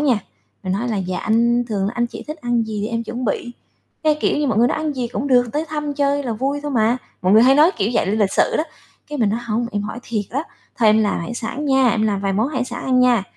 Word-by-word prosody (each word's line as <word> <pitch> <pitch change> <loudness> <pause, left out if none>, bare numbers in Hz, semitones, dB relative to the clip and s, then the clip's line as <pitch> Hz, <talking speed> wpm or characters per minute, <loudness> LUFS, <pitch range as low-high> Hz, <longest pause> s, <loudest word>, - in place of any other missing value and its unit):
nha, 265 -7 +3 0.4
mình 185 - -2
nói 225 +6 -1
là 220 - -1
"Dạ, 185 -2 -2
anh 235 +2 +2
thường 200 -3 -1
anh 240 0 +1
chị - - -9
thích 305 - -4
ăn 240 -3 +1
gì 210 -1 -3
em 230 0 -2
chuẩn 245 +3 -5
bị?" 240 +2 -2 0.5
Cái, 305 -1 +3
kiểu - - +1
như, 295 - +1
mọi 220 -5 +1
người 240 +2 +5
nói: - - -1
"Ăn 310 -1 -1
gì 245 -2 -2
cũng 260 +3 -3
được, 245 -1 +5
tới 305 +2 -1
thăm 295 -1 -3
chơi 285 0 +1
là 245 -4 -2
vui 275 +6 -2
thôi 295 - -3
mà" 235 -1 +2 0.3
mọi 185 +1 +3
người 220 +2 +7
hay 260 +2 +6
nói 305 +5 +6
kiểu 210 0 0
vậy - - +2
l - - 0
lịch 195 -2 +2
sự - - +2
đó, 310 - +1 0.4
cái, 295 0 -5
mình 220 -4 +3
nói: 225 +3 -1
"Hông, 230 +2 -1
em 205 0 -1
hỏi 210 +3 -5
thiệt 215 -4 -3
á, 275 +5 -1 0.3
thôi 225 -3 +4
em 215 +1 +5
làm 205 - 0
hải 230 +8 -5
sản 240 +5 -4
nha, 265 -2 +4
em 215 - 0
làm 205 -3 0
vài 195 0 -1
món 215 +6 +1
hải 260 -4 -2
sản - - -6
ăn 255 -1 +3
nha." 245 -4 +4
240 Hz, 285 wpm, -20 LUFS, 215-270 Hz, 0.5 s, người